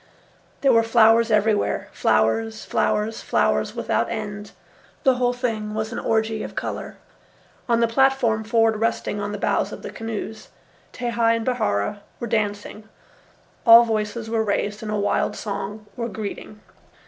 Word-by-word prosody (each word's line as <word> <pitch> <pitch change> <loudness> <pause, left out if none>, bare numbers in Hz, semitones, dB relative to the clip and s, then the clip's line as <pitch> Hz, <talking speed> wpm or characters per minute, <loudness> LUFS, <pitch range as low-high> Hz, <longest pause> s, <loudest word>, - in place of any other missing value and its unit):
There 275 -2 +4
were 230 - +6
flowers 225 0 +4
everywhere, 215 -1 +1
flowers, 225 -1 +1
flowers, 215 +1 0
flowers, - - 0
without - - 0
end. 205 -1 -5 0.5
The 265 -3 +4
whole 245 -1 +2
thing 225 -4 -3
was 220 +1 -2
an - - -3
orgy 220 -1 0
of - - -7
colour. - - -5 0.7
On 235 0 +3
the 230 - +4
platform 245 -2 +2
forward 225 0 +2
resting 220 -2 -1
on 205 0 -3
the 205 - -4
bows - - 0
of - - -9
the - - -6
canoes, 220 -1 -6 0.4
Tehei 235 -1 +1
and 230 -1 -3
Bihaura 210 - -1 0.2
were - - -3
dancing. 210 -1 -3 0.7
All 230 0 +9
voices 220 0 -2
were 225 0 0
raised 205 0 -1
in 220 - -6
a 215 - -1
wild 205 - 0
song 205 +1 -5
or 235 -1 -3
greeting. 210 0 -7
220 Hz, 150 wpm, -23 LUFS, 210-230 Hz, 0.7 s, All